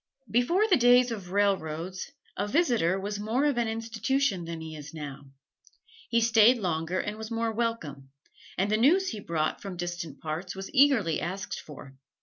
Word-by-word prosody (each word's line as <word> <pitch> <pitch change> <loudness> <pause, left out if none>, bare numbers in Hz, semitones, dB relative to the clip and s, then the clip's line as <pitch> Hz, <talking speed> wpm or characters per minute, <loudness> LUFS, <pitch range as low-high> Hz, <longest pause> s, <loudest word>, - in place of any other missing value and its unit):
Before 340 - +3
the 380 - +5
days 245 0 +5
of 200 -6 -6
railroads, 185 - -1 0.2
a 205 - -2
"visitor" 230 - +2
was 205 +1 -4
more 225 +7 0
of 285 -5 +1
an 235 - +1
institution 225 -2 -1
than 165 0 -5
he 160 -1 -7
is 150 +1 -10
now. 145 -2 -7 0.8
He 235 0 +3
stayed 230 +1 +5
longer 175 -2 -1
and 210 +1 -3
was 220 0 -6
more 230 -1 -1
welcome; 210 - -3 0.5
and 195 +3 +1
the 215 - +3
news 355 - +4
he 220 - -5
brought 160 -5 -2
from 195 -3 -7
distant 175 -4 -5
parts 160 +5 -5
was 195 0 -7
eagerly 260 - +4
asked 190 +5 -4
for. 140 -2 -11
205 Hz, 170 wpm, -28 LUFS, 170-235 Hz, 0.8 s, the